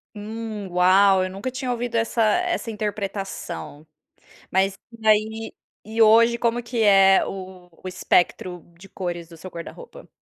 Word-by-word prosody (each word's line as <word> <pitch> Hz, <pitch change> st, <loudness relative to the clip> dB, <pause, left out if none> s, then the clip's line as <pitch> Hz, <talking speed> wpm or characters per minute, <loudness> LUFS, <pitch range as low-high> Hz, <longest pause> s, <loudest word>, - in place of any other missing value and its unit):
Hum, 215 Hz, -1 st, -6 dB
uau! 185 Hz, +2 st, +4 dB
Eu 185 Hz, -, -3 dB
nunca 195 Hz, +7 st, -5 dB
tinha 255 Hz, 0 st, -3 dB
ouvido 240 Hz, -1 st, -3 dB
essa 230 Hz, +1 st, 0 dB
essa 340 Hz, +3 st, +1 dB
interpretação. 195 Hz, -, -5 dB, 0.7 s
Mas 190 Hz, +1 st, +1 dB, 0.2 s
e 220 Hz, -, -9 dB
aí 220 Hz, +1 st, +1 dB, 0.3 s
e 220 Hz, +2 st, -4 dB
hoje 230 Hz, +2 st, +5 dB
como 235 Hz, +1 st, 0 dB
que 235 Hz, -1 st, -2 dB
é 195 Hz, -2 st, +6 dB
o 185 Hz, -2 st, -9 dB, 0.2 s
o -, -, -4 dB
espectro 180 Hz, -1 st, 0 dB
de 195 Hz, -, -14 dB
cores 175 Hz, -3 st, -5 dB
do 165 Hz, -, -13 dB
seu 185 Hz, +4 st, -10 dB
guarda-roupa? 485 Hz, -, -10 dB
205 Hz, 145 wpm, -23 LUFS, 185-230 Hz, 0.7 s, é